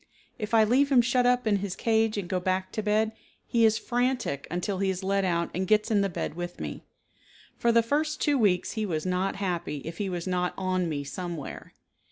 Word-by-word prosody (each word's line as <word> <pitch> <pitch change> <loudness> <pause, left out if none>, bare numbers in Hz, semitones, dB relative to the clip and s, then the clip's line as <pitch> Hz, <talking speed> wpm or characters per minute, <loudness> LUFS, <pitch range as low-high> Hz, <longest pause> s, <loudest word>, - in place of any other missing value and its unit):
If 215 +1 -1
I 220 - +7
leave 265 +6 +3
him 250 -3 +6
shut 245 +1 +2
up 250 -1 +2
in 210 -2 +3
his 195 -1 -4
cage 225 -1 +1
and 195 -3 -3
go 185 -1 0
back 185 +1 -1
to 215 - -2
bed, 215 +1 +1 0.3
he 230 -1 +3
is 220 0 +4
frantic 245 - -1
until 180 +3 -2
he 195 -1 +1
is 190 0 -3
let 195 +1 +1
out 170 -2 0
and 185 +1 -2
gets 215 +2 +3
in 205 -2 +4
the 200 - +1
bed 175 - -3
with 175 +1 -6
me. - - -5 0.8
For 235 - +3
the 230 0 +4
first 305 +5 0
two 290 -2 +2
weeks 190 -5 +2
he 220 - -2
was 160 -6 -2
not 185 +1 0
happy 175 -6 -2
if 165 +1 -7
he 200 -2 -1
was 175 -2 -4
not 180 -1 -1
on 185 -2 0
me 145 -2 -2
somewhere. 170 0 -6
200 Hz, 225 wpm, -27 LUFS, 180-225 Hz, 0.8 s, I